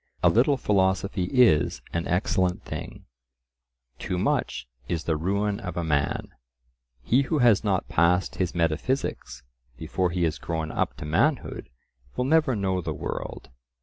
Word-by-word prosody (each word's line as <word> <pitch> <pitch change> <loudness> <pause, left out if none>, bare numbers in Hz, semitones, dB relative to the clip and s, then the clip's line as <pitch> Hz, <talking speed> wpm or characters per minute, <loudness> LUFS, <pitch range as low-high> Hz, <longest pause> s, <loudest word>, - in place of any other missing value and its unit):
A - - +7
little 135 +5 +3
philosophy 95 -3 +1
is 95 - +3
an 85 0 -1
excellent 90 0 0
thing; - - -7 0.9
too 90 - -3
much 90 - -1 0.2
is 85 -2 -2
the 80 - 0
ruin 100 +5 -1
of 90 -2 -6
a 85 - -1
man. 70 -3 0 0.7
He 125 - +3
who 150 +3 -1
has 120 -7 +4
not 100 -4 0
"passed 85 0 +2
his 90 -2 -1
metaphysics" 85 - -1 0.3
before 90 +8 -1
he 90 0 -1
has 80 -1 0
grown 80 -2 -3
up - - -1
to - - -7
manhood 120 - 0 0.5
will 125 - 0
never 150 -2 +3
know 95 -3 0
the 80 -3 -4
world. 70 - -6
90 Hz, 150 wpm, -26 LUFS, 80-105 Hz, 0.9 s, A